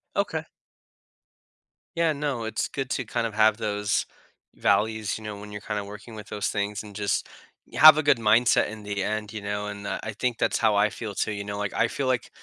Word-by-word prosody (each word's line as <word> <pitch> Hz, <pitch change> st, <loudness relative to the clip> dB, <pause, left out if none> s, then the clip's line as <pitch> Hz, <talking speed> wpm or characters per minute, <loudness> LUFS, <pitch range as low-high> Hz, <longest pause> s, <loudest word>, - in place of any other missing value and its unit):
Okay. -, -, -1 dB, 1.5 s
Yeah. 165 Hz, -2 st, +3 dB
No. 140 Hz, -5 st, -2 dB
It's 110 Hz, -1 st, -2 dB
good 135 Hz, -2 st, -4 dB
to 130 Hz, -, -1 dB
kinda 115 Hz, +1 st, -2 dB
have 110 Hz, 0 st, +4 dB
those 105 Hz, -2 st, 0 dB, 0.5 s
values, 110 Hz, -1 st, +1 dB
you 110 Hz, -, -11 dB
know, 105 Hz, -1 st, -6 dB
when 105 Hz, 0 st, -10 dB
you're 105 Hz, 0 st, -7 dB
kinda 105 Hz, -1 st, -3 dB
working 105 Hz, +3 st, -10 dB
with 105 Hz, -1 st, -9 dB
those 105 Hz, -1 st, -2 dB
things 105 Hz, 0 st, -2 dB
and 105 Hz, -1 st, -12 dB
just 100 Hz, -1 st, -1 dB, 0.5 s
have 155 Hz, 0 st, +9 dB
a 155 Hz, -, +1 dB
good 145 Hz, -4 st, +4 dB
mindset 115 Hz, +2 st, +4 dB
in 110 Hz, 0 st, -9 dB
the 100 Hz, -1 st, -2 dB
end, 105 Hz, +1 st, -3 dB
you 105 Hz, -, -5 dB
know, 105 Hz, 0 st, -3 dB
and, 100 Hz, -1 st, -6 dB
uh, -, -, -2 dB
I 110 Hz, -, -4 dB
think 120 Hz, +2 st, -1 dB
that's -, -, +1 dB
how 110 Hz, -2 st, +3 dB
I 105 Hz, +1 st, +4 dB
feel, 105 Hz, -3 st, -6 dB
too, -, -, 0 dB
you 100 Hz, -1 st, -4 dB
know, 100 Hz, 0 st, -5 dB
like, 105 Hz, -1 st, -3 dB
I 115 Hz, -, +2 dB
feel 140 Hz, -, -3 dB
like 130 Hz, -2 st, 0 dB
105 Hz, 215 wpm, -26 LUFS, 105-115 Hz, 1.5 s, have